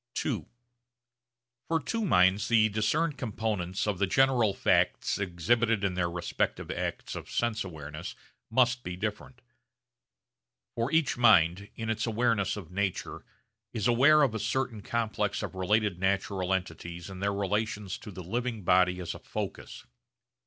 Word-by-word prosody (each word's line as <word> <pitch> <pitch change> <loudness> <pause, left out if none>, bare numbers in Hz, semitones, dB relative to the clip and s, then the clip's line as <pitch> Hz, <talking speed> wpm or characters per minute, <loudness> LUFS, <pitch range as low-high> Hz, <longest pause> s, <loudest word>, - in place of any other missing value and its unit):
(ii) - - -1 1.2
For 165 0 +1
two 225 - -2
minds, 95 - +4
the 110 -2 +4
discerned 140 +8 0
components 105 -6 -2
of 105 -4 -1
the 100 - +2
general 125 0 +3
facts 100 - +1
exhibited 105 +4 +1
in 100 -2 +1
their 90 -1 0
respective 85 0 -2
acts - - -4
of - - -7
sense 115 -2 0
awareness 75 -3 -7 0.3
must 125 +1 +3
be 90 - -5
different. 110 +5 -5 1.3
For 115 +4 -1
each 160 -5 +2
mind, 100 -4 +5
in 110 -1 -2
its 110 +1 -2
awareness 110 -4 +1
of 90 -5 -9
nature 95 0 -3 0.5
is 110 -1 0
aware 140 +6 +6
of 130 -6 +2
a 110 - -2
certain 125 -2 -2
complex 110 -2 -1
of - - -5
related 100 0 +1
natural 95 -1 0
entities 85 -2 -3
in 95 -1 -8
their 100 +1 0
relations 105 0 -2
to - - -10
the 95 -2 -8
living 115 +3 -3
body 90 0 +3
as 85 - -4
a - - -10
focus. - - -6
105 Hz, 145 wpm, -29 LUFS, 95-115 Hz, 1.3 s, aware